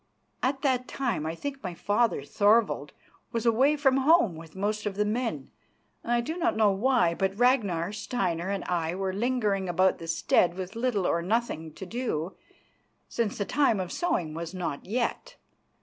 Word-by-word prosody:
At 270 +2 -1
that 255 -3 +1
time 240 - -2
I 160 - -3
think 275 +7 -5
my 180 -3 -5
father, 205 -4 +1
Thorvald, 205 -4 +2 0.4
was 230 -1 -2
away 260 +6 +4
from 270 -2 +3
home 270 - +4
with 160 +1 -12
most 210 +2 -2
of 200 - -3
the 210 +1 +1
men, 210 - -2 0.5
I 240 0 +1
do 315 +8 -4
not 345 -4 0
know 215 -2 +5
why; 225 -3 +2
but 190 +2 -1
Ragnar, 205 -8 +2
Steinar 190 -5 -2
and 200 -1 -2
I 170 -1 -1
were 190 0 -2
lingering 210 -4 0
about 185 +2 +2
the 165 - -8
stead 170 +1 +2
with 190 +3 -6
little 230 -5 0
or 170 - +1
nothing 180 -5 -1
to 190 - -8
do, 190 -6 -3 0.7
since 230 -3 -2
the 205 - -1
time 270 -4 +2
of 180 -2 -3
sowing 175 - -1
was 165 +2 -6
not 175 -5 -4
yet. 235 +4 -2
205 Hz, 175 wpm, -28 LUFS, 175-245 Hz, 0.7 s, know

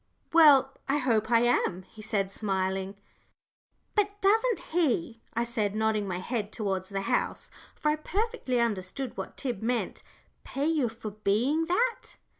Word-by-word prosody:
"Well, 285 -5 +7 0.2
I 280 - +3
hope 230 -6 +1
I 230 -1 +5
am," 195 -6 +1
he 215 - -14
said, 200 -2 -1
smiling. 190 -1 -1 1.0
"But 410 -1 0
doesn't 445 +3 +3
he," 245 - 0
I 235 - +2
said, 220 -4 -1
nodding 215 -1 +1
my 180 -2 -2
head 210 +2 -3
towards 190 -4 -2
the 195 -1 -2
house, - - -1 0.2
for 300 - 0
I 300 - +1
perfectly 390 - -1
understood 230 +3 -2
what - - -6
Tib 250 -5 -3
meant, 240 +1 -1 0.4
"pay 275 +2 -3
you 305 -7 +2
for 225 -1 -7
being 220 +10 +1
that?" 465 +7 0
235 Hz, 150 wpm, -28 LUFS, 205-300 Hz, 1.0 s, Well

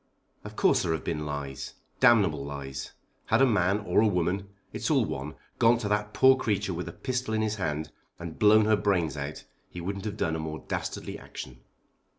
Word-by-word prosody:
"Of - - -9
course - - +3
there 85 - 0
have 80 - -3
been 75 -2 -3
lies, 70 -2 -5 0.2
damnable 105 - +4
lies. 70 -1 -6 0.3
Had 110 - +3
a 135 - +7
man, 105 -5 +2
or 95 0 +2
a 110 - +4
woman, 95 +1 0 0.2
it's - - -2
all - - +3
one, 70 +4 -5 0.2
gone 115 +1 +5
to 115 -3 -3
that 105 0 0
poor 130 +4 +6
creature 105 -7 -1
with 90 +1 -4
a - - -5
pistol 125 -4 -2
in 110 - +1
his 110 0 -1
hand 80 -4 -2 0.3
and 85 -2 -8
blown 110 0 +6
her 110 0 +4
brains 95 -7 +1
out 70 +1 -5 0.3
he 90 - -8
wouldn't 100 +4 -4
have 105 - -4
done 80 - 0
a - - -3
more 80 0 -6
dastardly - - -4
action." - - -9
95 Hz, 200 wpm, -28 LUFS, 75-110 Hz, 0.3 s, a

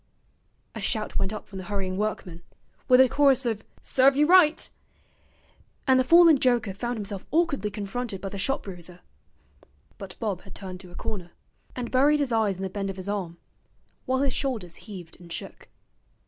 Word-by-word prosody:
A - - -6
shout 215 -4 -1
went 195 0 -1
up 215 - -6
from 195 - -8
the 185 - -7
hurrying 190 -1 -2
workmen, 190 -4 -3 0.5
with 250 -1 +6
a 260 - +7
chorus 270 0 +3
of 220 -2 -2 0.2
'Serve 265 +1 +4
ye 295 - +5
right,' 330 -1 +5 1.2
and 260 -1 +5
the - - +4
fallen 330 +1 +7
joker 240 -6 +2
found 240 +4 -3
himself 200 -2 -5
awkwardly 315 -9 +1
confronted 210 +1 -4
by 195 - -5
the 200 - -7
shop 270 +8 0
bruiser. 180 -2 -9 1.0
But 195 -3 -8
Bob 205 -5 -2
had 190 - -13
turned 185 -2 -7
to 185 -1 -10
a - - -14
corner, 185 -6 -5 0.4
and 245 -2 -4
buried 285 +3 +4
his 280 -3 0
eyes 220 -4 +2
in 190 - -5
the 190 - -2
bend 195 -1 -3
of 195 - -6
his 185 0 -7
arm, 190 -5 -3 0.7
while 260 +1 +1
his 275 -3 +1
shoulders 225 - -3
heaved 180 -6 -10
and 170 -1 -13
shook. 165 - -7
210 Hz, 185 wpm, -26 LUFS, 190-260 Hz, 1.2 s, a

